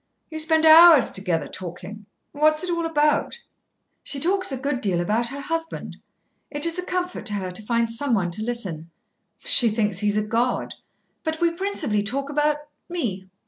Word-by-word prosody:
"You 315 - -5
spend 320 0 +2
hours 320 -3 +8
together 175 -6 -1
talking. 190 +3 -9 0.2
What 305 +1 +3
is 310 - 0
it 360 - -2
all 335 -1 -1
about?" 300 +8 0 0.6
"She 280 - -4
talks 375 +3 0
a 265 - -2
good 270 0 -3
deal 185 -4 0
about 215 +7 0
her 280 +4 -6
husband. 325 +2 -5 0.5
It 290 +1 0
is 335 +2 -2
a - - -3
comfort 360 0 -3
to 210 - -1
her 185 -2 -4
to 180 - -4
find 230 +1 -1
someone 230 -8 0
to 195 - -1
listen. 195 -9 -3 0.5
She 235 - +4
thinks 210 -3 0
he 210 - 0
is 205 0 +1
a 210 - +1
god. 235 +3 -1 0.5
But 315 0 -3
we 340 -1 +2
principally 335 - -1
talk 275 +7 -3
about 295 0 +1 0.3
me." 220 - -4
260 Hz, 185 wpm, -23 LUFS, 210-320 Hz, 0.6 s, hours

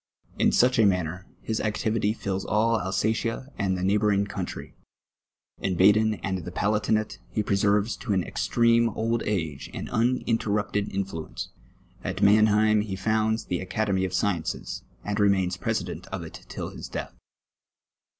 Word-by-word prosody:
In - - +4
such 125 0 +4
a 110 - +6
man 90 -3 +2
ner, 90 +4 -7 0.2
his 110 - -1
activity 110 0 0
fills 95 -3 -3
all 115 +2 +2
Alsatia 110 +7 -1
and 95 -2 +1
the 90 - -3
neighbouring 100 +1 +2
countrj'; - - -6 0.9
in 95 -2 -1
Baden 105 +4 +5
and 95 -1 -1
the 90 - -6
Palatinate 105 0 0
he 105 - -1
preserves 100 +2 +2
to 115 - -4
an 95 -2 +2
extreme 115 +3 +2
old 115 +2 -1
age 80 -9 -2
an - - -5
uninterrupted 110 -3 0
iuHuence; 95 -5 -4 0.5
at - - -3
[Mannheim 110 +1 +5
he 105 -2 -4
founds 110 +3 0
the 90 - -2
Academy 95 0 0
of 95 -1 -1
Sciences, 90 -3 -1 0.2
and 105 +1 -1
remains 95 -3 +3
president - - -3
of - - -5
it - - -11
till - - -5
his - - -8
death. - - -5
105 Hz, 150 wpm, -26 LUFS, 95-110 Hz, 0.9 s, a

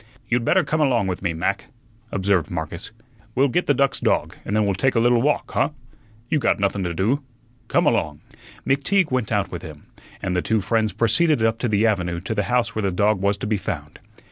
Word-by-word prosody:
"You'd 120 0 +1
better 180 +9 +3
come 155 0 -1
along 125 -8 +2
with 95 -2 -3
me, 90 -3 0
Mac," 85 +4 -2 0.5
observed 95 -2 +1
Marcus. 85 0 -5 0.5
"We'll 135 +2 +3
get 175 +8 0
the 145 - +4
duck's 140 +1 +1
dog, - - 0
and 105 - -3
then 110 -1 +3
we'll 100 - +1
take 125 +9 +1
a - - +4
little 120 0 +4
walk, 145 +3 0
huh? - - +1 0.6
You 155 - +1
got - - +2
nothun 100 0 0
to 85 - -2
do. 115 - +1 0.5
Come - - +2
along." 75 -1 +1 0.5
McTeague 155 +5 +2
went 125 -4 -1
out 100 -3 0
with 90 - -5
him, 75 -2 -11 0.3
and 90 -1 -2
the 90 - +2
two 110 +3 +1
friends 110 +2 0
proceeded 115 - +2
up 115 +1 +1
to 120 - 0
the 105 +1 +2
avenue 90 -6 0
to 105 - -3
the 105 -2 -1
house 120 -2 +1
where 110 - -2
the 100 -2 0
dog 100 +2 +1
was 100 +1 +1
to - - -5
be 105 0 0
found. 75 -7 -6
105 Hz, 220 wpm, -22 LUFS, 95-125 Hz, 0.6 s, the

